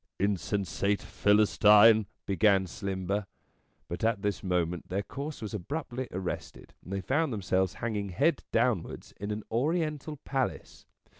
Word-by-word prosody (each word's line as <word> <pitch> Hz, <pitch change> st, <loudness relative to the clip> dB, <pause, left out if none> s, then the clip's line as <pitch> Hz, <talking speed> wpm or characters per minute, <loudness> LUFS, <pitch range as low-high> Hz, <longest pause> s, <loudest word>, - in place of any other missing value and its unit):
" -, -, -59 dB
Insensate 100 Hz, +1 st, -1 dB
Philistine," 105 Hz, +1 st, +5 dB, 0.2 s
began 100 Hz, -1 st, +3 dB
Slimber; 100 Hz, +1 st, -3 dB, 0.6 s
but -, -, -5 dB
at 110 Hz, -3 st, +1 dB
this 105 Hz, -1 st, -1 dB
moment 90 Hz, -2 st, -1 dB
their 100 Hz, +2 st, -1 dB
course 140 Hz, +3 st, -6 dB
was 105 Hz, -, -5 dB
abruptly 130 Hz, -, -4 dB
arrested, 90 Hz, 0 st, -5 dB
and 90 Hz, -, -10 dB
they 100 Hz, 0 st, -2 dB
found 140 Hz, -, +1 dB
themselves 95 Hz, -3 st, 0 dB
hanging 105 Hz, -4 st, -3 dB
head 145 Hz, -, +1 dB
downwards 110 Hz, -10 st, 0 dB
in 100 Hz, +2 st, -4 dB
an 105 Hz, 0 st, -3 dB
Oriental 150 Hz, +3 st, -1 dB
Palace. 135 Hz, -2 st, -3 dB
105 Hz, 135 wpm, -29 LUFS, 95-125 Hz, 0.6 s, Philistine